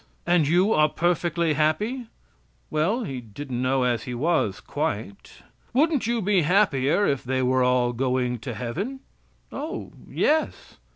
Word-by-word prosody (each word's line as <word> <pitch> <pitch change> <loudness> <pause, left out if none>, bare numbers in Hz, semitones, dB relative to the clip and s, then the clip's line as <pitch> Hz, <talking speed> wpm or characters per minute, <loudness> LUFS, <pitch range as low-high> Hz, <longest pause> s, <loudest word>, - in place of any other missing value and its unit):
"And 170 -4 +3
you 180 +7 +3
are 155 0 +4
perfectly 170 -1 0
happy?" 210 - 0 0.6
"Well, 190 +11 +1
he 135 - -5
didn't 120 +3 -6
know 130 0 +1
as 120 -2 0
he 125 -2 -4
was 130 - 0
quite." 100 -1 -5 0.3
"Wouldn't 290 -2 +2
you 235 -2 0
be 195 -1 +3
happier 175 -1 +2
if 140 -7 0
they 130 +1 -1
were 130 +1 +2
all 125 -1 +2
going 125 -1 -1
to 105 - -6
heaven?" 195 - -4 0.5
"O, 300 +4 -5 0.2
yes." 315 +1 -1
150 Hz, 140 wpm, -25 LUFS, 125-200 Hz, 0.6 s, are